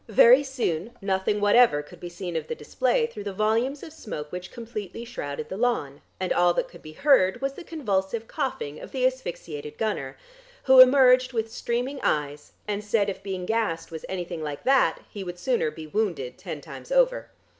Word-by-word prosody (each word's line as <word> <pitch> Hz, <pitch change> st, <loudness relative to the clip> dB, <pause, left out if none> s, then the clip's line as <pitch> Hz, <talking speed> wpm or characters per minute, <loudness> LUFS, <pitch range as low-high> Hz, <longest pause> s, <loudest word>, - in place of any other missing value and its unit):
Very 240 Hz, +5 st, +7 dB
soon 240 Hz, -, -3 dB
nothing 195 Hz, +1 st, 0 dB
whatever 205 Hz, -6 st, +5 dB
could 150 Hz, -, -15 dB
be 175 Hz, -, -7 dB
seen 175 Hz, -1 st, -6 dB
of 160 Hz, -, -2 dB
the 470 Hz, -, -3 dB
display -, -, 0 dB
through 210 Hz, -, -8 dB
the 200 Hz, -, -3 dB
volumes 230 Hz, +7 st, 0 dB
of 315 Hz, -, -9 dB
smoke 150 Hz, -, -7 dB
which 180 Hz, 0 st, -7 dB
completely 230 Hz, -2 st, -7 dB
shrouded 145 Hz, -11 st, -5 dB
the 190 Hz, -, -6 dB
lawn, 205 Hz, -, -1 dB, 0.2 s
and 185 Hz, -1 st, 0 dB
all 175 Hz, 0 st, +3 dB
that -, -, 0 dB
could 175 Hz, -, -15 dB
be 155 Hz, -, -11 dB
heard 245 Hz, -, +3 dB
was 275 Hz, +1 st, -2 dB
the 355 Hz, -, -10 dB
convulsive 225 Hz, -, -2 dB
coughing 255 Hz, -, -3 dB
of -, -, -11 dB
the 255 Hz, -1 st, +1 dB
asphyxiated 170 Hz, -, -4 dB
gunner, 140 Hz, -12 st, -2 dB, 0.5 s
who 265 Hz, -1 st, +7 dB
emerged 255 Hz, -1 st, +7 dB
with 225 Hz, -1 st, -2 dB
streaming 250 Hz, +4 st, -2 dB
eyes 145 Hz, 0 st, -2 dB
and 210 Hz, 0 st, -2 dB
said 210 Hz, -1 st, +1 dB
if 190 Hz, -, -9 dB
being 190 Hz, -2 st, -4 dB
gassed 220 Hz, -7 st, -1 dB
was 160 Hz, -1 st, -7 dB
anything 175 Hz, -3 st, -4 dB
like 150 Hz, -2 st, -5 dB
that 270 Hz, 0 st, +3 dB
he 200 Hz, -, -7 dB
would 175 Hz, -1 st, -6 dB
sooner 240 Hz, -2 st, 0 dB
be 155 Hz, +1 st, -9 dB
wounded 160 Hz, -, -2 dB
ten -, -, -7 dB
times -, -, -11 dB
over. -, -, +2 dB
210 Hz, 190 wpm, -26 LUFS, 175-255 Hz, 0.5 s, Very